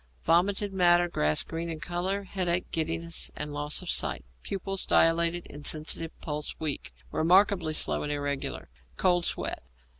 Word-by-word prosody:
Vomited 195 +4 +2
matter 175 -1 +4
grass 75 - +1
green 165 +1 -5
in 160 -1 -4
colour. 180 +4 -2
Headache, 180 -2 -1
giddiness, 165 +1 -2
and 150 -1 -4
loss 150 +4 0
of 180 - -6
sight; 65 - +2 0.2
pupils 195 0 -2
dilated, 170 +1 +3
insensitive; 155 +2 -1
pulse 150 -1 -3
weak, 150 - -3 0.2
remarkably 180 -1 +3
slow - - +1
and 150 - -3
irregular; 145 -1 -3 0.3
cold 175 -2 +2
sweat. - - -2
170 Hz, 140 wpm, -28 LUFS, 155-180 Hz, 0.3 s, matter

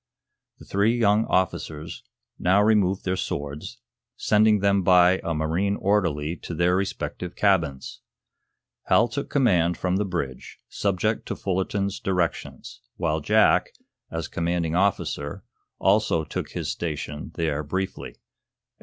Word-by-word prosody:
The - - -14
three 105 +4 +1
young 110 -1 +3
officers 80 -4 -2 0.4
now 95 +3 +3
removed 100 -3 +2
their 95 0 0
swords, 75 - -5 0.4
sending 105 0 +4
them 100 0 +2
by 90 0 +5
a 85 - -2
marine 85 +6 0
orderly 85 -7 0
to 85 - -7
their 90 +2 +2
respective 95 -2 -3
cabins. 80 -10 0 0.8
Hal 115 - +4
took 140 - -4
command 90 - +2
from 90 0 0
the 105 - +1
bridge, 85 -10 -5
subject 100 +2 -1
to - - -3
Fullerton's 100 +1 -2
directions, 90 -3 -3
while 80 -3 -1
Jack, 75 - +3 0.4
as 80 -1 -4
commanding 85 -1 -1
officer, 90 -6 -1 0.3
also 95 -5 +2
took - - -5
his - - -3
station 75 -2 -5
there 80 -3 -1
briefly. 95 +6 -4
90 Hz, 125 wpm, -25 LUFS, 80-100 Hz, 0.8 s, by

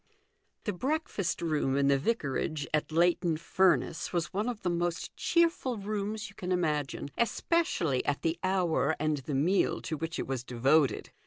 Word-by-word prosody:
I. - - -47 0.6
THE 210 - -1
breakfast 260 - -2
room 150 -4 +1
in 140 0 +3
the 140 -1 +4
vicarage 155 - -1
at 155 +1 0
Leighton 170 0 +2
Furness 175 0 +1
was 170 -3 -2
one 210 +5 0
of 235 -4 -6
the 180 - +1
most 175 0 -2
cheerful 335 -8 +1
rooms 210 +1 -3
you 200 - -13
can 185 -2 -5
imagine, 150 -5 -1
especially 235 - +1
at 145 - -1
the 165 0 0
hour 175 -5 +1
and 155 0 +1
the 135 +1 -4
meal 175 +8 +2
to 165 - -3
which 165 +2 -4
it - - -2
was 130 -2 -3
devoted. 135 +4 +2
170 Hz, 170 wpm, -30 LUFS, 150-200 Hz, 0.6 s, the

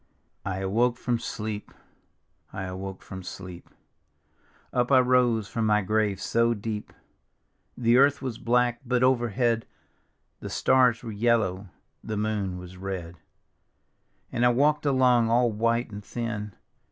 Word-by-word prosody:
I 95 0 -3
awoke 120 +6 +1
from 120 -2 -1
sleep, 105 -2 -5 0.8
I - - -5
awoke 95 +1 -6
from 95 -1 -8
sleep, 90 -1 -9 1.0
Up 125 +1 +1
I 130 - +7
rose 125 -4 +3
from 115 -1 -1
my 105 -1 +3
grave 105 -1 0
so 115 +2 +1
deep! 105 0 -5 0.9
The 120 0 +3
earth 140 +1 +5
was 130 -4 -5
black, 120 +1 +1
but 125 -1 +1
overhead 120 -2 +1 0.7
The - - -7
stars 125 -3 +3
were 115 - -5
yellow, 105 -3 +1 0.4
the 110 - -4
moon 105 -3 -2
was 90 0 -10
red; 90 -3 -6 1.1
And 120 - -1
I 125 - +6
walk'd 145 +4 +2
along 125 -4 +4
all 120 0 +3
white 115 +2 0
and 105 0 -8
thin. 105 -2 -5
115 Hz, 135 wpm, -26 LUFS, 100-125 Hz, 1.1 s, I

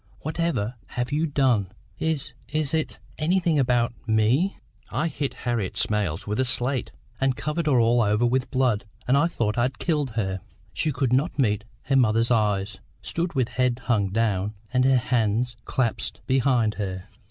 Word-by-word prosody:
what 155 +3 -5
ever 125 -10 0
have 125 +2 -3
you 155 +3 +1
done? 125 - +2 0.3
Is 150 -7 -1 0.2
is 155 -1 -1
it 160 -1 -1 0.2
anything 170 -1 +2
about 120 -3 +2
me." 115 - +2 0.3
"I 160 - 0
hit 140 -3 -3
Harriet 115 -6 -1
Smales 100 -7 0
with 105 +3 -2
a - - +4
slate, 125 +1 0 0.3
and 135 -1 +2
covered 155 +4 -2
her 130 -5 +4
all 120 +1 +4
over 105 +2 +2
with 125 +2 +1
blood, 125 -6 +1 0.2
and 130 - +4
I 145 +4 +4
thought 115 -8 -1
I'd 130 +2 0
killed 150 -7 -1
her." 95 -3 -1 0.3
She 155 +11 0
could 130 -3 0
not 145 +6 +1
meet 105 -6 +1 0.2
her 135 - 0
mother's 115 -2 +3
eyes; 105 -3 +1 0.2
stood 170 +1 -2
with 130 -2 +1
head 125 0 0
hung 105 -5 +1
down, 105 -1 0 0.2
and 125 0 +3
her 135 -1 +5
hands 120 -1 +1
clasped 125 -5 -1
behind 125 -4 +2
her. 95 -2 -4
125 Hz, 170 wpm, -25 LUFS, 110-140 Hz, 0.3 s, her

